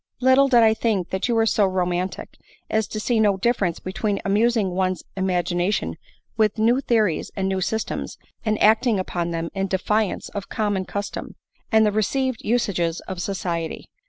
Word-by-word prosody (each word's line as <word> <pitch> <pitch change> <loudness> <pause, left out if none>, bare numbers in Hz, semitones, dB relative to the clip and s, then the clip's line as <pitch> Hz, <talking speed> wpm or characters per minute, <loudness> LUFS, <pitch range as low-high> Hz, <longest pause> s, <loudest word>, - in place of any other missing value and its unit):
Little 260 +2 +5
did 240 -4 +5
I 220 -1 +5
think 215 -6 -1
that 190 +4 -1
you 240 - +1
were 225 0 +3
so 210 -2 +3
roman 180 0 0
tic, - - -9 0.4
as 220 -1 +1
to 215 - -5
see 230 +1 +1
no 205 -3 +3
difference 195 -5 0
between 200 +2 -2
amusing 210 0 +2
one's 185 0 -1
im 190 0 -1
agination 180 +2 0 0.4
with 215 -1 +2
new 235 +5 +3
theories 215 - +1
and 190 -1 -1
new 190 -1 -1
systems, 220 +4 -3 0.3
and 215 -1 0
acting 220 +1 +4
upon 175 -2 -2
them 165 0 -3
in 195 0 -1
defiance 200 +2 -1
of 200 -1 -6
common 205 -4 -1
custom, 200 +2 -5 0.4
and 220 0 +5
the 210 - +2
received 250 +4 0
usages 180 -8 0
of 185 -2 -6
society. 170 -4 -3
205 Hz, 175 wpm, -23 LUFS, 185-220 Hz, 0.4 s, Little